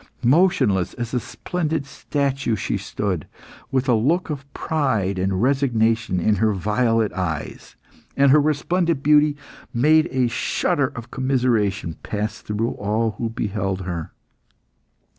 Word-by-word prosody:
Motionless 130 - +3
as 120 0 -5
a 125 - +2
splendid 160 +1 -3
statue, 140 -3 -1
she 105 - -2
stood, 100 -3 -3 0.4
with 130 0 0
a 125 - +4
look 155 +10 +1
of 140 -1 -7
pride 115 -12 -1
and 95 +2 0
resignation 115 -7 +1
in 105 +4 +2
her 110 +2 +2
violet 110 +3 +1
eyes, 80 -5 -4 0.4
and 140 -1 +5
her 150 +1 +6
resplendent 155 +1 0
beauty 150 0 +4 0.4
made 155 +6 +4
a 130 -1 +2
shudder 130 +3 0
of 115 0 -8
commiseration 115 -10 0
pass 105 0 -3
through 105 +3 -2
all 110 +2 -1
who 115 - -1
beheld 100 -4 -2
her. 85 -3 -5
120 Hz, 130 wpm, -22 LUFS, 105-140 Hz, 0.4 s, her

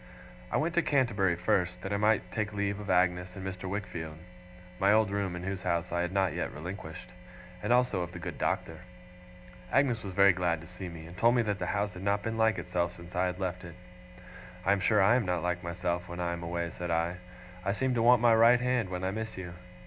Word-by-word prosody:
I - - +2
went 165 +2 0
to 175 - +3
Canterbury 115 - +2
first, 90 -1 0
that 95 - -3
I - - +1
might 105 -3 +2
take 110 0 -2
leave 100 0 -1
of 105 -1 -7
Agnes 90 0 +2
and 95 -1 -7
Mr. 95 0 -5
Wickfield 90 -6 -5 0.6
(my 100 +1 +4
old 110 -1 +4
room 100 -3 -1
in 90 - -6
whose 95 0 -3
house 85 -1 -1
I 85 0 0
had 90 0 -1
not 95 -1 +1
yet - - -2
relinquished), 80 +1 -8 0.5
and - - -1
also 125 -6 +3
of 85 0 -4
the 90 - -8
good 85 - -6
Doctor. 80 -1 -1 0.9
Agnes 125 -5 +2
was 95 -3 -7
very 100 0 +6
glad 85 -2 0
to - - -11
see 90 +1 -8
me, 80 -1 -9
and 85 +2 -11
told 120 +5 +4
me 120 - +3
that 105 -2 -2
the - - -2
house 100 -1 -1
had 90 - -9
not 100 +1 0
been 115 0 -2
like 110 -2 +3
itself 90 -1 -1
since 85 0 -12
I 90 +1 +2
had 90 +1 -4
left 90 -1 -3
it. 85 -1 -9 0.9
'I 95 - +4
am 100 - +3
sure 100 +2 +3
I 110 +5 +5
am 125 - 0
not 90 -2 0
like 90 0 -1
myself 85 0 -3
when 85 0 -6
I 85 -1 -1
am 85 - -5
away,' 85 0 -3
said 90 0 -5
I. 85 +2 0 0.5
'I 100 - 0
seem 130 +3 0
to 120 - +1
want 120 0 +5
my 120 -1 +6
right 115 +2 +6
hand, 125 -5 0
when 90 0 -4
I 95 - 0
miss 110 +1 -5
you. 90 -2 -6
95 Hz, 240 wpm, -30 LUFS, 90-105 Hz, 0.9 s, very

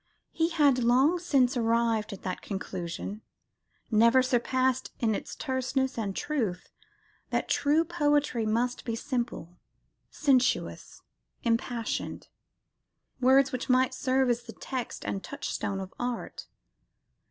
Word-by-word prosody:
He 325 0 +1
had 290 -6 +3
long 265 +9 +4
since 275 -7 +2
arrived 230 -2 +1
at 200 - -9
that 185 -1 -4
conclusion, 190 +1 -5 0.7
never 230 +4 +5
surpassed 255 0 +1
in 225 -2 +2
its - - -5
terseness 265 -1 -1
and 205 -4 -3
truth, 220 - -2 0.6
that - - -1
true 300 +3 +2
poetry 295 -7 +1
must 240 +3 0
be 230 - -2
"simple, 235 - -4 0.5
sensuous, 265 -3 0 0.4
impassioned," 230 0 -2 0.9
words 265 +1 +5
which 255 0 -4
might 255 +1 +3
serve 260 0 +1
as 240 0 -1
the 235 -1 -10
text 255 -3 -5
and 195 - -3
touchstone 200 -7 -3
of 190 -1 -7
art. 245 -1 -4
250 Hz, 120 wpm, -28 LUFS, 225-265 Hz, 0.9 s, never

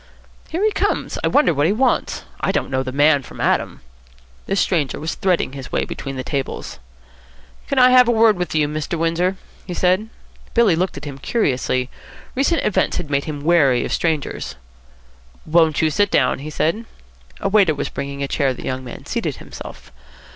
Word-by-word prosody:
"Here 340 +5 -2
he 430 - +3
comes. - - -1
I - - +3
wonder 290 - +3
what 145 +1 +2
he - - +2
wants. 250 +4 0 0.2
I - - 0
don't - - -2
know 130 0 +1
the 130 -1 -4
man 145 +1 +4
from - - -13
Adam." - - 0 0.7
The 195 - 0
stranger 165 -8 0
was 160 +1 -3
threading 180 -7 0
his 135 -2 -8
way - - 0
between 135 0 -6
the 130 - -4
tables. 135 +1 -4 0.9
"Can 275 - -2
I 255 0 +7
have 250 -1 +7
a - - +4
word 225 -2 +5
with 180 -3 -3
you, 150 -1 +3
Mr. 155 +2 -3
Windsor?" 165 +3 +1 0.3
he 180 - -4
said. 185 +5 +1 0.5
Billy 230 -7 +5
looked 180 -2 -1
at 140 - -7
him 140 -2 -7
curiously. 130 - 0 0.5
Recent 280 +6 +1
events 210 - +1
had 155 -5 -5
made 140 0 +1
him 145 -2 -5
wary 145 -7 +3
of - - -3
strangers. 155 - -2 0.9
"Won't 160 -1 +3
you 155 - +3
sit 205 +5 +2
down?" 130 -7 +2
he 150 +3 -6
said. 165 +9 -1 0.5
A - - -1
waiter 195 -6 +4
was 145 - -3
bringing 140 0 -5
a - - -1
chair. 135 -2 0
The - - -9
young 130 0 -3
man 125 - -9
seated - - -2
himself. - - -11
160 Hz, 190 wpm, -20 LUFS, 140-195 Hz, 0.9 s, I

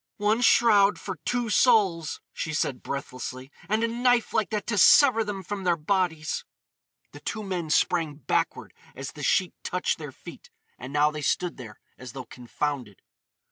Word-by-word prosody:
"One 215 +3 +1
shroud 210 -4 +5
for 190 -3 -6
two 240 -3 -1
souls!" 195 - +3
she 155 -2 -4
said 130 -4 -1
breathlessly, 130 -1 -6 0.2
"—and 215 +2 +1
a - - +2
knife 240 0 +1
like 220 - +1
that 210 -2 -3
to 210 - -2
sever 240 +2 +6
them 205 -3 -5
from 200 +2 -5
their 175 -2 +2
bodies!" 160 -2 -1 0.7
The 145 - -11
two 215 +7 -5
men 180 -5 -4
sprang 160 -1 +1
backward 140 -4 -2 0.2
as - - -6
the - - -11
sheet - - +1
touched - - -1
their - - -7
feet, - - -13 0.3
and 130 +2 -8
now 150 +1 +3
they 150 0 -6
stood 175 +3 -1
there 110 -5 -11 0.2
as 125 -2 -9
though 130 -2 -7
confounded. 125 -3 -5
180 Hz, 170 wpm, -26 LUFS, 145-215 Hz, 0.7 s, sever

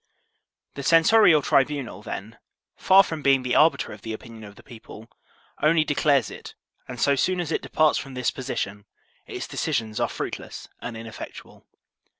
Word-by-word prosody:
The 140 - -7
censorial 165 +1 +5
tribunal, 135 -9 0
then, 110 +2 -8 0.4
far 195 +1 +5
from 160 -4 -6
being 135 -2 +3
the 125 -1 -2
arbiter 160 -7 +3
of 105 - -13
the 110 0 -6
opinion 110 0 -10
of 100 0 -13
the - - -17
people, 115 -2 -13 0.5
only 155 +1 +4
declares 145 -5 +1
it, - - -11 0.3
and 125 -1 -8
so 140 - +3
soon 185 +7 0
as 170 -3 -3
it - - -1
departs 155 -1 +2
from 135 -1 -9
this 125 -1 0
position, 100 -6 -5 0.4
its - - -6
decisions 110 -2 -2
are - - 0
fruitless - - -6
and 120 -2 -7
ineffectual. 115 -1 -10
135 Hz, 160 wpm, -24 LUFS, 115-155 Hz, 0.5 s, censorial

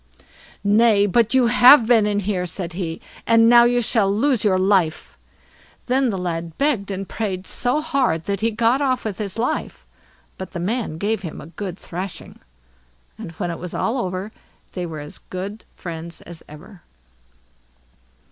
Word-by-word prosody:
"Nay, 205 0 +4
but 230 +4 +2
you 255 -2 +5
have 245 +2 +7
been 225 -3 +4
in 205 -1 0
here", 185 -2 -2
said 175 0 -5
he; 165 -2 -4 0.3
"and 230 0 +5
now 240 0 +7
you 245 0 +2
shall 210 -3 +2
lose 245 +3 +1
your 195 -3 +3
life." 185 -4 +1 0.7
Then 260 +1 +1
the 195 - -2
lad 170 -2 -4
begged 250 -9 0
and 195 0 -4
prayed 190 -4 -4
so 250 +9 0
hard 270 - 0
that 200 +1 -2
he 225 - +1
got 230 +4 +1
off 260 -4 0
with 210 -2 -4
his 205 -1 -4
life, 235 +2 -3 0.5
but 190 -1 -7
the 175 - -4
man 205 -2 -2
gave 210 +4 -1
him 170 -4 -7
a - - -9
good 190 -3 -6
thrashing. 185 +1 -7 0.8
And - - -7
when 175 +2 -3
it 170 - -6
was 180 0 -7
over, 205 -4 -2 0.4
they 180 -2 -4
were 155 -2 -7
as 150 - -9
good 195 +4 -7
friends 170 -1 -8
as 170 -1 -12
ever. 170 +5 -13
200 Hz, 165 wpm, -21 LUFS, 180-230 Hz, 0.8 s, have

